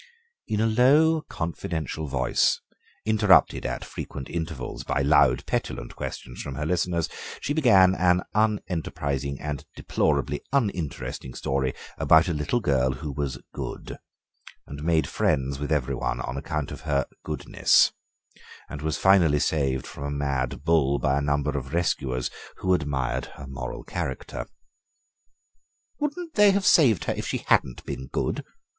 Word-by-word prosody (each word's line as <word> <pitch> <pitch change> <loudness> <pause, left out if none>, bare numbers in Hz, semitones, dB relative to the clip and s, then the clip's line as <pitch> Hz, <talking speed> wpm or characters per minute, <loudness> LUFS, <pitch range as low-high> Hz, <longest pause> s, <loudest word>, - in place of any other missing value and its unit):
In 105 - -1
a 110 - +3
low, 145 +8 +4
confidential 80 -2 -3
voice, 65 -2 +2 0.5
interrupted 105 - +4
at 60 0 -4
frequent 65 - -7
intervals 80 -6 -4
by 70 - 0
loud, 70 -3 +4
petulant - - -3
questionings - - -6
from 70 - -6
her 75 - -3
listeners, 85 0 0 0.3
she 145 - -2
began 100 -11 +6
an 90 -1 +3
unenterprising 80 -10 -1
and 75 -1 -4
deplorably - - 0
uninteresting 90 - -2
story 65 -1 -1 0.2
about 80 +2 +5
a 85 - 0
little 75 +11 0
girl 65 -6 +2
who 75 +3 -5
was 70 -2 -3 0.2
good, - - -6 0.7
and 70 +1 -8
made 80 -1 +2
friends 70 0 0
with 75 +2 -4
every 70 -3 +1
one - - -2
on 60 - -4
account 75 0 -3
of 70 - -7
her 70 -4 0 0.2
goodness, - - +3 0.8
and 70 - -6
was 80 -2 -1
finally 90 -6 +5
saved 70 -4 0
from - - -8
a 70 - -2
mad 70 -2 -2
bull 75 -4 +3
by 70 +1 +1
a - - -2
number 70 0 0
of 70 +2 -4
rescuers 65 -7 0 0.3
who 95 - +1
admired 65 -6 -1
her 70 - -9
moral 65 0 -6
character. - - -4 1.5
"Wouldn't 320 +3 -3
they 210 -4 +6
have 195 0 +2
saved 120 - +5
her - - -1
if - - -5
she - - -2
hadn't 60 - +2
been 65 +1 -5
good?" - - -2
75 Hz, 145 wpm, -26 LUFS, 70-90 Hz, 1.5 s, began